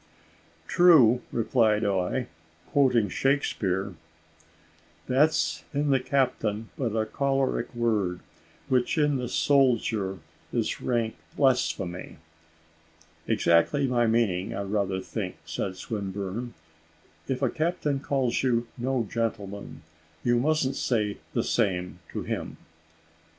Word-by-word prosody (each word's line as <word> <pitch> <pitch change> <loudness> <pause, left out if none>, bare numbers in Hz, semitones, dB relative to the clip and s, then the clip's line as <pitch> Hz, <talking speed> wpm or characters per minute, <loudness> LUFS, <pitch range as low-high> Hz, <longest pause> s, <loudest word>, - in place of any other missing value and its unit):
"True," 145 -10 +6
replied 110 -2 +2
I, 95 -3 0 0.5
quoting 125 -6 +3
Shakespeare: 100 -6 0 1.1
"`That's 145 +5 +2
in 145 0 +1
the 135 - +4
captain 120 -5 0
but 115 -5 -2
a 110 -1 +1
choleric 135 0 0
word, 105 -7 0 0.5
Which 125 +4 +1
in 150 -2 +3
the 125 -2 -3
soldier 115 -9 +2 0.3
is - - -1
rank 115 -3 -1 0.2
blasphemy.'" 125 -9 0 1.1
"Exactly 85 - +3
my 120 -2 +2
meaning 105 -5 +1
I 100 - -2
rather 100 -1 -1
think," 95 -1 -5
said 95 +3 -3
Swinburne, 100 +3 -4 0.7
"if 135 0 -2
a 130 - +3
captain 155 -3 -1
calls 135 -4 0
you 120 -2 +1
no 125 -2 0
gentleman, 100 -7 -4 0.4
you 120 0 +3
mustn't 140 -1 +1
say 105 -4 0 0.2
the - - +2
same 90 -5 0
to - - -4
him." - - -4
115 Hz, 110 wpm, -27 LUFS, 100-135 Hz, 1.1 s, True